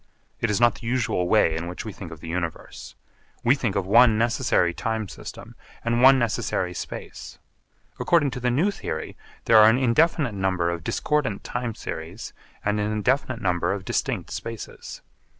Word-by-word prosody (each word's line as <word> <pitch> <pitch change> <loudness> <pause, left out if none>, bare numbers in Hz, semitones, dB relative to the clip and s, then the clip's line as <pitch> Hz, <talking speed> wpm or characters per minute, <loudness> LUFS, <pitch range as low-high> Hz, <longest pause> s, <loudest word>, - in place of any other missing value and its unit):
It 115 - 0
is 105 - +1
not 120 0 +5
the 115 - -7
usual 115 -7 0
way 85 -7 +4
in 85 +1 -4
which 90 +5 -6
we 110 - -6
think 90 -3 -9
of 80 -2 -10
the 85 - -9
Universe. 85 -1 -5 0.5
We 120 - +5
think 115 -8 -2
of 100 -2 0
one 110 +2 +6
necessary 115 -6 +2
time 110 +1 -2
system - - -10 0.3
and 120 +1 +1
one 135 +1 +8
necessary 105 -6 -1
space. - - -8 0.6
According 150 -5 +2
to 125 - -5
the 125 0 0
new 155 +12 +2
theory, 80 - -5 0.3
there 115 - +6
are 110 0 +8
an 115 - +3
indefinite 135 +1 +2
number 95 -3 0
of 85 -1 -5
discordant 130 - -1
time 120 -2 -4
series 85 +8 -7 0.3
and 105 +1 +1
an 105 +1 -1
indefinite 125 +3 0
number 90 0 +1
of 95 -1 -6
distinct - - -2
spaces. 115 -2 -7
110 Hz, 175 wpm, -24 LUFS, 90-125 Hz, 0.6 s, one